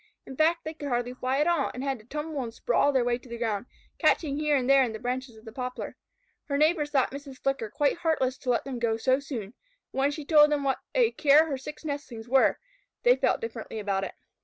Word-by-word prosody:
In 265 - -9
fact, 330 +3 +2
they 315 - -5
could 295 -2 -7
hardly 245 0 -1
fly 255 +1 -1
at 295 - +3
all, 340 -5 +2
and 255 - -4
had 270 -3 -2
to 215 - -18
tumble 300 +2 -4
and 235 -2 -5
sprawl 285 - +2
their 260 -3 +2
way 245 0 +1
to 250 - -16
the 235 - -5
ground, 225 -1 -2 0.3
catching 290 -4 +2
here 300 -1 +2
and 255 -3 0
there 275 0 +6
in 235 -3 -2
the 220 - -6
branches 250 -1 -4
of 220 - -17
the 220 - -8
poplar. 250 +1 -5 0.5
Her 280 -2 -1
neighbors 305 0 +2
thought 270 -3 +2
Mrs. 280 -1 -8
Flicker 270 -6 -1
quite 290 +9 +1
heartless 270 -6 0
to 255 - -5
let 240 - +2
them 265 -3 -4
go 225 -1 +1
so 260 +3 +2
soon, 245 -7 -6 0.4
but - - -4
when 275 +1 +3
she 290 0 -6
told 300 -1 +6
them 290 -1 +1
what 270 -1 0 0.2
a 480 -2 +4
care 305 +1 +5
her 285 -4 -3
six 300 +4 -9
nestlings 275 -6 -5
were, 265 +2 +4 0.5
they - - +6
felt - - +1
differently 460 - -6
about 200 -2 -1
it. - - -5
270 Hz, 245 wpm, -27 LUFS, 245-300 Hz, 0.5 s, there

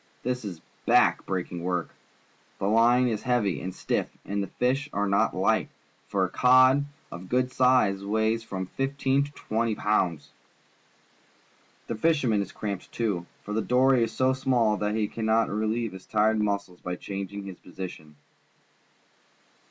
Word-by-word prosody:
This 125 0 -2
is 90 -5 -6 0.3
back - - +4
breaking 90 -2 -3
work. 90 -1 -2 0.7
The - - -3
line 120 +4 +4
is 110 -3 -1
hea^y 110 - 0
and 95 - -3
stiff, - - -2 0.2
and 100 0 -2
the 100 - -3
fish 130 +8 -1
are 100 +1 0
not 100 +1 +2
light, - - +1 0.4
for 95 -2 +1
a - - -4
cod 130 +2 +5 0.3
of 90 +2 -9
good 125 +1 +1
size 125 -7 +3
weighs 110 +2 +1
from 95 -4 -4
fifteen 135 +4 0
to 145 - -11
twenty 115 -3 -1
pounds. 85 -10 0 1.5
The - - -3
fisherman 120 -4 +2
is 95 - -5
cramped, 100 -3 -5
too, 100 -7 -2 0.2
for 105 - -5
the 110 - +1
dory 125 +2 +3
is 115 - -2
so 130 0 +2
small 125 -5 +2
that 105 0 -1
he 110 -1 0
cannot 110 +1 +1
relie^'e 110 +2 -1
his 95 0 -11
tired 110 0 +2
muscles 100 -3 -2
by 90 0 -3
changing 100 +1 -6
his 95 -2 -9
position. 90 -4 -9
110 Hz, 155 wpm, -27 LUFS, 95-125 Hz, 1.5 s, cod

